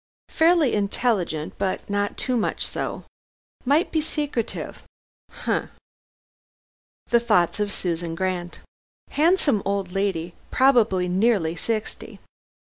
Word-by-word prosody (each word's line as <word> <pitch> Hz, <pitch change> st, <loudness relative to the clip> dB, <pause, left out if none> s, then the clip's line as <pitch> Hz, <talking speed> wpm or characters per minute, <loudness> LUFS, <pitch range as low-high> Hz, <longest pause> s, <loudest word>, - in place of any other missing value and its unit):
Fairly 325 Hz, -5 st, +4 dB
intelligent, 200 Hz, -6 st, 0 dB
but 190 Hz, -1 st, -2 dB
not 205 Hz, 0 st, -1 dB
too 255 Hz, -, 0 dB
much 225 Hz, -, 0 dB
so. -, -, -4 dB, 0.6 s
Might 290 Hz, +7 st, +3 dB
be 315 Hz, -, +1 dB
secretive. 295 Hz, -6 st, -3 dB, 0.5 s
Humph!" -, -, -2 dB, 1.4 s
The 235 Hz, -, +6 dB
thoughts 210 Hz, -5 st, +2 dB
of 205 Hz, -1 st, 0 dB
Susan 170 Hz, -3 st, -3 dB
Grant. 180 Hz, -1 st, -3 dB, 0.5 s
"Handsome 305 Hz, -, +3 dB
old 195 Hz, -2 st, -1 dB
lady, 180 Hz, -3 st, -1 dB, 0.2 s
probably 230 Hz, -9 st, +4 dB
nearly 185 Hz, -3 st, +2 dB
sixty. 220 Hz, +2 st, -4 dB
205 Hz, 105 wpm, -24 LUFS, 180-250 Hz, 1.4 s, The